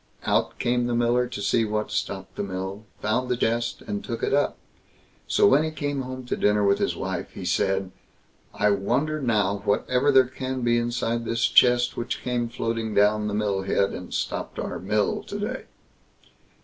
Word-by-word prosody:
Out - - +1
came 120 0 +1
the 120 - 0
miller 120 +1 +2
to 120 -4 -6
see 115 +3 +2
what 105 0 -2
stopped 95 -1 -3
the - - -3
mill, 95 +2 -5 0.2
found 125 +4 0
the 125 - +1
chest 120 +1 -1
and 205 0 -4
took 115 -2 -5
it - - +1
up. 145 +1 +2 0.7
So - - +3
when 135 +7 +5
he 155 - -1
came 145 -3 -3
home 130 0 -6
to - - -1
dinner 105 0 +2
to - - -4
his - - 0
wife, - - -4
he - - -7
said: 95 -1 0 0.6
"I 105 - +2
wonder 130 +10 0
now 105 -5 +1
whatever 125 +6 +2
there 130 -1 +6
can 130 +1 -4
be 120 0 +3
inside 120 0 -1
this 115 +1 0
chest 120 0 +4
which 120 +1 -3
came 120 -2 -1
floating 115 -2 -3
down 105 +1 +3
the 105 - -2
mill 105 -2 0
head, 100 +1 +1
and 90 - -7
stopped - - -3
our - - -4
mill 105 +3 0
to 205 - -6
day?" 245 +6 -4
120 Hz, 190 wpm, -25 LUFS, 105-125 Hz, 0.7 s, there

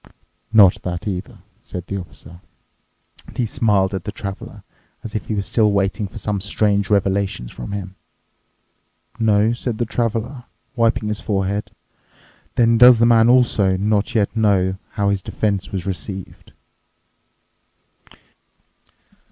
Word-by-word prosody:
"Not 105 -5 +6
that 90 +2 -5
either," 90 -2 -5 0.2
said 90 -7 -7
the 100 +1 -4
Officer, 85 -1 -12 0.9
and - - -14
he 125 - +1
smiled 105 -5 +1
at 95 - -3
the 105 - -5
traveler, 100 -1 -8 0.4
as 110 - -8
if 110 - -4
he 110 - -2
was 100 -1 -2
still 110 -3 +2
waiting 100 +1 0
for - - -11
some 105 -2 -2
strange 100 0 0
revelations 95 - 0
from - - -8
him. 95 -2 -5 1.3
"No?" 110 0 +3
said 120 -1 -4
the 120 - -1
Traveler, 120 +2 -3 0.3
wiping 115 -2 +1
his 105 -1 -2
forehead, 100 0 -2 0.9
"then 115 -1 +3
does 125 -1 +9
the 115 - +4
man 115 0 +5
also 110 -7 +3
not 105 +4 0
yet 105 0 +1
know 95 -4 +1
how 100 -1 0
his 100 -1 0
defence 100 -1 -2
was 95 -3 -4
received?" 95 0 -6
100 Hz, 135 wpm, -20 LUFS, 95-115 Hz, 1.3 s, does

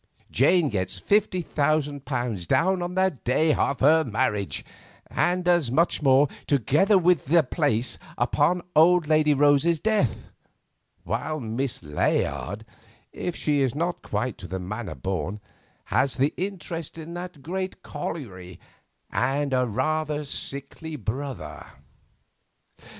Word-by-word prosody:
Jane 155 +4 +4
gets 95 -2 -2
fifty 195 - +1
thousand 145 -2 0
pounds 120 - -3
down 185 - +2
on 175 +1 -4
the 185 -7 +1
day 155 +5 +3
of 140 -2 0
her 160 +4 +5
marriage, 105 - -1 0.4
and 180 0 0
as 175 -7 +3
much 160 +8 +2
more, 135 0 +5 0.2
together 150 - +3
with 180 -4 +3
the 165 +4 +4
place, 130 -4 -1 0.2
upon 150 +8 +2
old 165 +1 +5
Lady 155 -1 +4
Rose's 145 +3 +4
death; 210 - 0 0.7
while 155 0 -2
Miss 120 -1 -3
Layard—if 75 - -3
she 150 -2 +1
is 130 -2 +1
not 170 +3 -2
quite 110 +3 -3
to 90 - -8
the 95 - -4
manner 100 +4 -5
born—has 95 - -3
the 140 +3 +2
interest 170 -4 -5
in 165 +1 -8
that 175 -5 -7
great 185 +4 -4
colliery 95 - -6 0.5
and 140 0 0
a 125 -1 +2
rather 150 +6 -1
sickly 140 +3 -6
brother. 135 +1 -5
145 Hz, 125 wpm, -25 LUFS, 125-170 Hz, 0.7 s, her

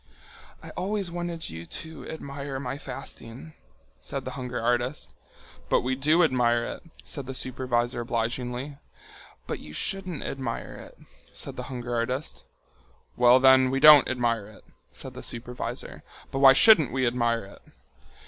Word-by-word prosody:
"I - - -9
always 195 -1 -2
wanted 175 -1 -4
you 80 +1 -8
to 160 -1 -8
admire 140 -3 -6
my 135 +1 -5
fasting," 125 +6 -8 0.5
said - - -5
the - - -4
hunger 125 -1 -5
artist. 120 - -1 0.6
"But - - +3
we 130 +2 -1
do 155 +6 +3
admire 120 -5 +2
it," - - -6 0.2
said 140 -4 -5
the 135 - -5
supervisor 125 -2 -1
obligingly. 125 +4 -3 0.7
"But - - -4
you 75 - -11
shouldn't 185 - -2
admire 130 -4 -4
it," - - -12 0.4
said - - -3
the - - -5
hunger 120 -2 -5
artist. 125 +5 -2 0.7
"Well 125 +1 +6
then, 130 0 +6
we 135 +1 0
don't 150 0 +9
admire 115 -4 0
it," 110 - -16 0.3
said - - -10
the - - -8
supervisor, 120 +1 -5 0.3
"but 135 - -2
why 135 -1 +9
shouldn't 160 - +7
we 130 +1 0
admire 120 -2 0
it?" 100 - -15
130 Hz, 150 wpm, -26 LUFS, 120-145 Hz, 0.7 s, don't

